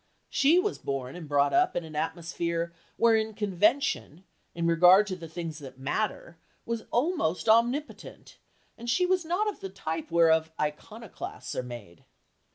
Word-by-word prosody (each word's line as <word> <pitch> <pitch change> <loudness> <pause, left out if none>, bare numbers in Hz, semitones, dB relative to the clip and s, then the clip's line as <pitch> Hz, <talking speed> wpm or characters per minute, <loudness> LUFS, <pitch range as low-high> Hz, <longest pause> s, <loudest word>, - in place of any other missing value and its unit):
She 295 +5 +4
was 405 +3 0
born 135 -1 -4
and 165 -4 -9
brought 145 -1 +2
up 360 +1 +3
in 175 - -1
an 160 -1 -10
atmosphere 170 +1 -2 0.2
wherein 220 -2 +3
convention, 205 - 0 0.3
in 170 0 -2
regard 180 +4 +6
to 190 -3 -4
the 170 -2 -9
things 165 -1 -6
that 135 -3 -11
matter, 170 +4 -3 0.3
was 230 -1 -3
almost 240 - 0
omnipotent, 240 +7 0 0.4
and 235 +1 -6
she 360 +9 +3
was 365 -1 +1
not 360 +6 0
of 420 - -3
the 195 - -6
type 165 -4 -5
whereof 160 -1 +4
iconoclasts 190 +9 -5
are - - -1
made. 120 -9 -10
180 Hz, 155 wpm, -28 LUFS, 160-235 Hz, 0.4 s, regard